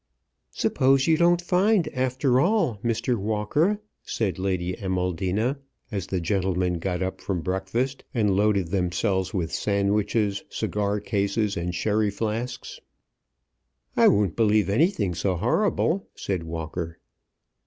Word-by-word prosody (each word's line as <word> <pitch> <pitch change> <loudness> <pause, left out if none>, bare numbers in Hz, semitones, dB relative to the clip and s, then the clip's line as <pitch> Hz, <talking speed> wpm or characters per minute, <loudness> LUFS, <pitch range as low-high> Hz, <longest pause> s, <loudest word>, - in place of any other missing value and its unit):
"Suppose 135 +1 +2
you 160 - +4
don't 175 +1 +3
find 185 +1 +3
after 130 0 +1
all, 175 - +2
Mr. 120 +1 0
Walker," 110 - 0 0.2
said 95 -6 -2
Lady 90 -1 -1
Amaldina, 95 - -1 0.3
as 100 -3 -3
the 95 - -1
gentlemen 90 -1 0
got 90 +1 -2
up 95 - -4
from 95 -4 -2
breakfast, 95 +10 -2
and 105 -5 +1
loaded 100 -4 +2
themselves 95 +1 0
with 85 -4 -2
sandwiches, 100 0 0
cigar 105 0 -1
cases, 100 0 0
and 85 +1 -3
sherry 105 +2 +1
flasks. 115 +4 -4 1.2
"I - - +6
won't 100 -3 +3
believe 105 -4 +3
anything 110 - +2
so 90 +2 0
horrible," 180 - +1
said 90 -4 -3
Walker. 80 +1 -5
100 Hz, 120 wpm, -25 LUFS, 95-125 Hz, 1.2 s, I